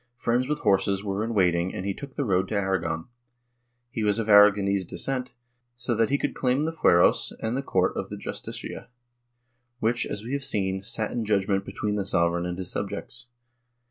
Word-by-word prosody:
Friends 120 +1 0
v/ith 150 0 -2
horses 100 -1 +2
were 100 +1 -2
in 115 0 -3
waiting 90 -2 +2
and 95 - -4
he 100 - 0
took 140 +5 -10
the 140 - -1
road 95 -3 +1
to 110 - -3
Aragon. 95 -5 -1 0.9
He 110 - -2
was 105 -1 +2
of 115 -1 -2
Aragonese 100 -1 +6
descent, 125 +6 -4 0.4
so 120 0 -1
that 115 0 +2
he 140 - +2
could - - -2
claim 130 +2 +1
the 160 +1 -1
fueros 85 - +4
and 110 +2 -2
the 135 - 0
court 95 -9 +1
of - - -4
the - - -6
Justicia, - - -6 0.9
which, 115 +2 +1
as 105 - -4
we 120 +4 -5
have 140 0 -1
seen, 95 -4 -1
sat 110 +1 -3
in 120 - -2
judgement 100 -2 +1
between 105 0 -2
the 100 - 0
sovereign 85 -2 +1
and 90 0 -4
his 95 -1 -4
subjects. 115 +4 -5
105 Hz, 195 wpm, -26 LUFS, 95-120 Hz, 0.9 s, Aragonese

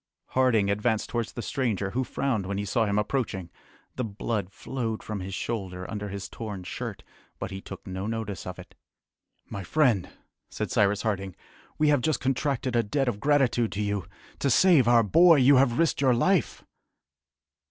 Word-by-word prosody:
Harding 115 -6 +3
advanced 105 +2 0
towards 120 -1 -2
the 120 - -5
stranger, 105 -7 -1
who 130 +4 0
frowned 120 -5 -1
when 100 0 -2
he 100 - -2
saw 110 +3 +1
him 100 0 0
approaching. 105 -6 -2 0.5
The 130 - -1
blood 105 -2 -3
flowed 115 +1 -4
from 105 -1 -4
his 95 +1 -5
shoulder 95 -6 -4
under 105 -1 -4
his 100 0 -5
torn 105 -5 -7
shirt, 90 - -6 0.3
but - - -5
he 95 0 -6
took - - -10
no 95 +1 -4
notice 110 -5 -4
of 90 - -6
it. - - -12 0.7
"My 100 - -6
friend," 120 - +2 0.4
said - - -4
Cyrus 100 0 +2
Harding, 100 -4 -2 0.4
"we 150 0 +3
have 145 -3 +3
just 155 -2 0
contracted 135 -1 -1
a 120 - +4
debt 135 +5 -1
of 110 -4 -1
gratitude 135 -4 +2
to 105 - -2
you. 100 -4 -2 0.3
To 140 - +1
save 150 -2 +5
our 120 -1 +6
boy 165 - +6
you 135 0 +6
have 125 -2 +3
risked 165 -4 +2
your 130 -3 +4
life!" 185 +8 +1
115 Hz, 180 wpm, -27 LUFS, 100-130 Hz, 0.7 s, our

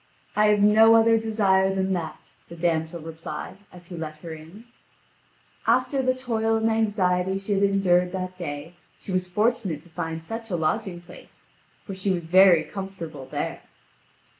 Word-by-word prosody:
"I 210 0 +4
have 210 -1 +3
no 220 +2 +7
other 225 0 +5
desire 195 -4 +2
than 190 0 0
that," 165 -3 -6 0.2
the 170 - -9
damsel 165 -1 -1
replied, 165 +3 -7
as 180 -1 -14
he 180 - -7
let 155 -2 -6
her 165 -2 -6
in. 160 +8 -12 1.0
After 255 +4 +2
the 255 0 +1
toil 225 -3 0
and 225 0 +1
anxiety 190 -4 +1
she 195 +1 -3
had 195 - +1
endured 185 -3 +3
that 185 -1 -4
day, 155 -2 -6 0.3
she - - -8
was 185 0 -1
fortunate 205 -5 0
to 175 - -19
find 160 0 -5
such 225 +6 -7
a 180 - -1
lodging 175 +2 -2
place; 175 - -15 0.4
for 195 - -6
she 190 +1 -3
was 175 -3 -1
very 180 -1 +6
comfortable 170 -8 -7
there. - - -4
190 Hz, 165 wpm, -25 LUFS, 170-215 Hz, 1.0 s, no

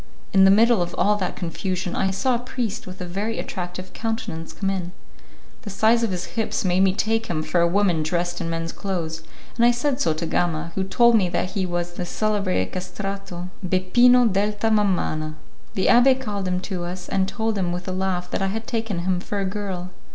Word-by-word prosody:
In 190 -1 +7
the - - +7
middle 225 +1 +5
of 175 - -2
all 210 +1 +3
that 190 -3 -2
confusion, 180 +1 -3
I 190 - +1
saw 250 +7 +1
a 235 - +1
priest 245 -5 -4
with 185 0 -8
a - - -3
very 200 +6 -3
attractive 180 0 -5
countenance 225 -8 -4
come 195 -1 -2
in. 180 -2 -4 0.7
The 225 - -7
size 220 +4 +3
of 230 - +1
his 180 -2 -3
hips 225 -3 -1
made 180 0 +2
me 190 0 +4
take 225 +2 0
him 155 -3 -1
for 175 +2 +1
a 170 - +4
woman 180 -3 +2
dressed 175 +3 -1
in 165 - -2
men's 165 0 -2
clothes, 165 -5 -3 0.3
and 235 - +2
I 240 - +7
said 255 +3 0
so 160 - +2
to 165 - -3
Gama, 165 0 -1
who 190 - -1
told 235 +4 +4
me 190 -5 +3
that 180 +1 -1
he 190 -2 -1
was 175 0 -2
the 175 - -4
celebrated 200 - 0
castrato, 185 -1 -5
Bepino 240 +8 +5
delta 210 +1 +1
Mamana. 175 -7 +1 0.4
The 190 - +1
abbé 260 +2 +6
called 205 -6 -3
him 180 0 0
to 185 -2 -4
us, 180 +1 -6
and 190 -1 +1
told 220 +1 -1
him 185 -3 0
with 180 +1 -4
a - - -1
laugh 185 -1 -2
that - - -1
I 195 - +1
had 220 +3 -3
taken 225 -7 -2
him 185 -1 +1
for 200 +2 -4
a 195 - 0
girl. 190 -2 -4
190 Hz, 215 wpm, -23 LUFS, 175-215 Hz, 0.7 s, In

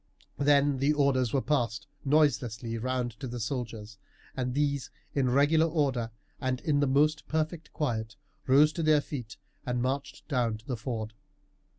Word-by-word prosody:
Then 140 -1 +4
the 140 +3 +3
orders 135 -5 +2
were 135 - +1
passed 120 -6 0 0.2
noiselessly 130 -6 +2
round 125 0 -1
to 135 - -5
the 120 0 -5
soldiers, 110 -3 -5 0.4
and 125 -1 -2
these, 140 -2 0 0.2
in 135 -3 +2
regular 145 +5 +4
order 135 -8 0 0.3
and 130 -1 -1
in 150 -4 +1
the 145 - +2
most 150 +3 +2
perfect 160 +1 -2
quiet, 110 -6 -2 0.3
rose 145 +4 +6
to 170 - -3
their 155 -1 +5
feet 125 -7 -7 0.3
and 125 -1 -1
marched 135 +3 -3
down 120 -6 0
to 110 - -20
the 125 - -2
ford. 110 -2 -4
135 Hz, 160 wpm, -29 LUFS, 120-145 Hz, 0.4 s, rose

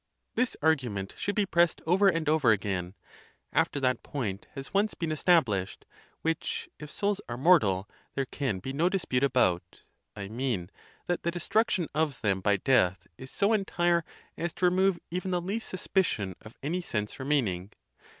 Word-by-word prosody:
This 250 +1 0
argument 120 -12 +1
should 205 - -2
be 210 - +2
pressed 170 -2 +3
over 190 +5 +4
and 165 -4 +2
over 150 -6 +4
again, 95 -3 -1 0.6
after 145 - +2
that 125 -2 +1
point 105 -8 -4
has 135 +3 -7
once 205 +1 +2
been 165 -2 -2
estab 165 +2 +5
lished, 100 -5 -3 0.4
which, 165 -1 -1
if 150 - -8
souls 205 +4 -1
are 120 - -3
mortal, 115 - +4 0.3
there 135 - 0
can 130 -6 -2
be 130 +9 -5
no 165 +6 +2
dispute 160 -9 0
about—I 100 -4 -1
mean, 110 -5 -2 0.3
that. 175 - -1
the 170 - 0
destruction 180 +1 +1
of 150 -2 0
them 100 -4 +1
by 100 +1 +3
death 90 -6 +2
is 130 - -8
so 200 +8 +2
entire 175 -4 +2 0.3
as 170 -1 -3
to 180 - 0
remove 185 +1 +3
even 180 +2 -2
the 180 -1 +1
least 200 +6 -3
suspicion 170 - 0
of 110 - -13
any 170 +6 -1
sense 105 -7 -3
remaining. 110 -10 0
145 Hz, 165 wpm, -29 LUFS, 105-175 Hz, 0.6 s, estab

